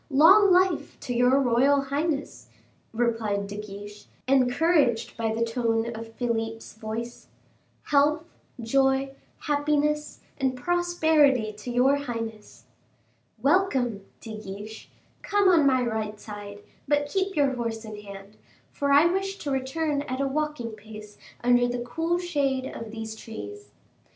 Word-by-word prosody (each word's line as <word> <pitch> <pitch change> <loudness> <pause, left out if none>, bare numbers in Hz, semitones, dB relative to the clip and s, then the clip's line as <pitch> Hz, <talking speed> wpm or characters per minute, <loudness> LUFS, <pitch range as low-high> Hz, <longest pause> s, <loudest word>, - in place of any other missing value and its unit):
"Long 375 +8 +7
life 365 -1 +2
to 245 - -3
your 250 +3 +4
royal 270 +2 +3
highness!" 285 +2 -3 0.4
replied 225 -3 0
De 200 +1 -7
Guiche, 205 0 -9 0.2
encouraged 255 -2 +2
by 225 -1 -1
the 230 +1 0
tone 230 0 -1
of 225 0 -9
Philip's 225 -2 -3
voice; 225 +2 -6 0.6
"health, 295 +2 +2 0.4
joy, 270 +3 +1 0.3
happiness, 300 0 0 0.2
and 265 -1 0
prosperity 315 -7 +2
to 210 +4 -9
your 255 +3 +3
highness." 230 -5 -6 0.8
"Welcome, 270 - +2 0.2
De 220 -2 -7
Guiche, 210 +2 -9 0.3
come 405 -1 +2
on 325 -6 +5
my 260 -2 +3
right 220 -3 -3
side, 205 -1 -9 0.2
but 290 0 +2
keep 385 +5 -1
your 280 -3 +2
horse 230 -2 -4
in 215 -1 -8
hand, 200 0 -11 0.3
for 280 0 -1
I 285 +3 +7
wish 390 +3 0
to 290 - -4
return 280 +3 -1
at 255 +1 -3
a 275 - +1
walking 295 -4 -2
pace 215 -1 -12 0.2
under 245 0 +4
the 245 0 -2
cool 325 +9 -1
shade 285 -7 -1
of 230 -3 -7
these 220 0 -6
trees." 105 - -9
250 Hz, 135 wpm, -26 LUFS, 225-290 Hz, 0.8 s, Long